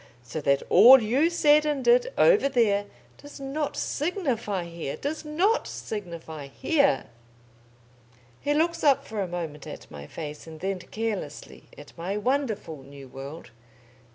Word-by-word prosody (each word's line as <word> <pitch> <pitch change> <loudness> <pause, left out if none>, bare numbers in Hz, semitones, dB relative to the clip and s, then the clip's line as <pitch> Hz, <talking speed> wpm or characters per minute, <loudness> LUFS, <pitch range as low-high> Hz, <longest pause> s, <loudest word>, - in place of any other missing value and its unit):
So 125 +6 -5
that 140 -1 +2
all 245 +8 +9
you 255 +9 +2
said 300 -3 +4
and 295 -3 -1
did, - - +4
over 430 - +5
there, 205 -6 +2 0.3
does 290 0 -12
not 275 +2 -3
signify 265 - -2
here 170 -4 -6
does 305 +3 -4
not 350 +9 +1
signify 170 -8 -7
here!" 280 - +1 1.3
He 290 0 0
looks 335 +2 +1
up 280 -3 +4
for 215 -2 -4
a 190 - -2
moment 165 -4 -6
at - - -10
my 70 0 -9
face, 150 - -8
and 160 -1 -10
then 195 +1 -2
carelessly 210 -5 -5
at 145 - -13
my 190 +4 -2
wonderful 215 - -2
new 140 0 -12
world. 140 +4 -9
215 Hz, 145 wpm, -26 LUFS, -, 1.3 s, all